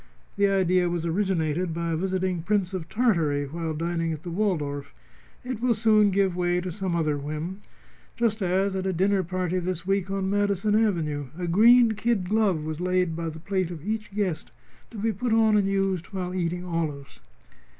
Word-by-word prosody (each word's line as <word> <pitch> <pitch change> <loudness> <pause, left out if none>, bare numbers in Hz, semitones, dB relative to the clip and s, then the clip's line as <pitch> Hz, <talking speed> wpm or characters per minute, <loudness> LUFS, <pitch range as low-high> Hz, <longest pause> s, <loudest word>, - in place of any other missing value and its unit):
The 200 0 +3
idea 185 -2 +2
was 170 -1 -2
originated 170 -2 0
by 170 0 -2
a - - +1
visiting 185 0 -1
Prince 195 0 0
of 170 -3 -5
Tartary 165 - +1
while 160 +2 -4
dining 165 +1 -1
at 155 -1 -6
the 175 - -5
Waldorf. 150 -8 -2 0.5
It 250 -3 -5
will 245 -2 +2
soon 215 -1 +4
give 190 -2 +1
way 175 0 +1
to 180 0 -4
some 185 -1 -2
other 155 -3 0
whim. 155 +7 -5 0.5
Just 225 -2 0
as 190 +1 +1
at 190 0 -2
a 190 - 0
dinner 190 +3 +2
party 185 0 -2
this 180 -1 -3
week 195 -1 0
on 195 -1 -1
Madison 205 +1 +1
Avenue 165 -10 +1
a 180 - -3
green 230 +7 +6
kid 215 -3 0
glove 200 -6 +1
was 155 +1 -4
laid 180 -2 +1
by 165 0 -3
the 160 - -8
plate 185 0 -1
of 170 -2 -8
each 215 0 -3
guest 195 -6 -2 0.4
to 230 - -10
be 220 +2 0
put 230 +4 -1
on 220 -1 +4
and 200 -2 +3
used 195 -3 0
while 185 -3 -4
eating 180 0 -2
olives." 155 -5 -4
185 Hz, 190 wpm, -26 LUFS, 165-200 Hz, 0.5 s, green